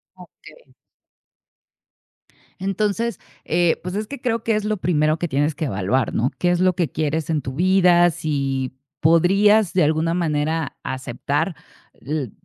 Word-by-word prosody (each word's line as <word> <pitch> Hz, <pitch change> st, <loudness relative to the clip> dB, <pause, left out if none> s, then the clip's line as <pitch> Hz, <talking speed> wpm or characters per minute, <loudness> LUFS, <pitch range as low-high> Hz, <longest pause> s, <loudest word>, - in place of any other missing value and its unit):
Okey. -, -, -17 dB, 1.9 s
Entonces, 205 Hz, +2 st, -1 dB, 0.3 s
eh, 170 Hz, 0 st, +2 dB
pues, 180 Hz, +1 st, -5 dB
es 210 Hz, +1 st, -3 dB
que 280 Hz, -, -8 dB
creo 230 Hz, -3 st, -1 dB
que 225 Hz, -1 st, +1 dB
es 210 Hz, 0 st, -2 dB
lo 215 Hz, 0 st, -1 dB
primero 155 Hz, -4 st, +1 dB
que 175 Hz, -, -2 dB
tienes 145 Hz, +1 st, 0 dB
que 155 Hz, -, -3 dB
evaluar, 110 Hz, +1 st, -1 dB
¿no? 125 Hz, +4 st, 0 dB
¿Qué 175 Hz, -, +2 dB
es 175 Hz, -, +1 dB
lo 185 Hz, 0 st, +3 dB
que 175 Hz, -3 st, -1 dB
quieres 155 Hz, +1 st, -2 dB
en 155 Hz, -2 st, 0 dB
tu 130 Hz, 0 st, -6 dB
vida? 175 Hz, +1 st, +4 dB
Si 135 Hz, -5 st, -2 dB, 0.3 s
podrías 195 Hz, +5 st, +4 dB
de 180 Hz, -, +3 dB
alguna 160 Hz, +2 st, +1 dB
manera 160 Hz, -2 st, -1 dB
aceptar 130 Hz, +6 st, -2 dB, 0.4 s
l 140 Hz, -5 st, -4 dB
165 Hz, 150 wpm, -21 LUFS, 145-190 Hz, 1.9 s, vida